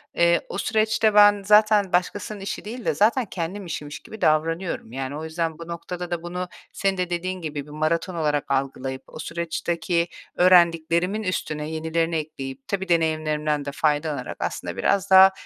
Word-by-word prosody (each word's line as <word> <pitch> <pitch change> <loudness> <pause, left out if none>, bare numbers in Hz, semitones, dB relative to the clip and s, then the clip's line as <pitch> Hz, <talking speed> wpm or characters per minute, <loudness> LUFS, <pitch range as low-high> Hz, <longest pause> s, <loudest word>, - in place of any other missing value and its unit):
eee, 170 0 +4
o - - -4
süreçte 220 +1 +2
ben 205 -1 +7
zaten 210 -2 +5
başkasının 205 +3 -1
işi 195 +1 -5
değil 235 +2 -7
de - - +2
zaten 230 +4 +3
kendi 185 +1 -5
işimmiş 150 -4 -6
gibi 220 - -12
davranıyorum. 165 -4 0
Yani, 135 +2 -4
o 155 - -6
yüzden 160 0 -2
bu 170 - -8
noktada 175 +1 -6
da 170 -1 -2
bunu, 180 +1 -4 0.2
senin 195 -1 0
de 180 -1 -1
dediğin 180 +1 -3
gibi 150 -3 -4
bir 150 - -13
maraton 165 +4 -1
olarak 150 -4 -1
algılayıp; 135 -1 -2
o - - -11
süreçteki 170 +1 -1 0.3
öğrendiklerimin 175 +2 +4
üstüne 155 -5 -3
yenilerini 160 +1 -1
ekleyip, 135 -4 -5
tabii 190 -2 -3
deneyimlerimden 155 -3 +1
de 140 - -3
faydalanarak, 150 -3 -1
aslında - - -4
biraz 195 -2 +1
daha 190 0 +9
170 Hz, 165 wpm, -24 LUFS, 155-190 Hz, 0.3 s, daha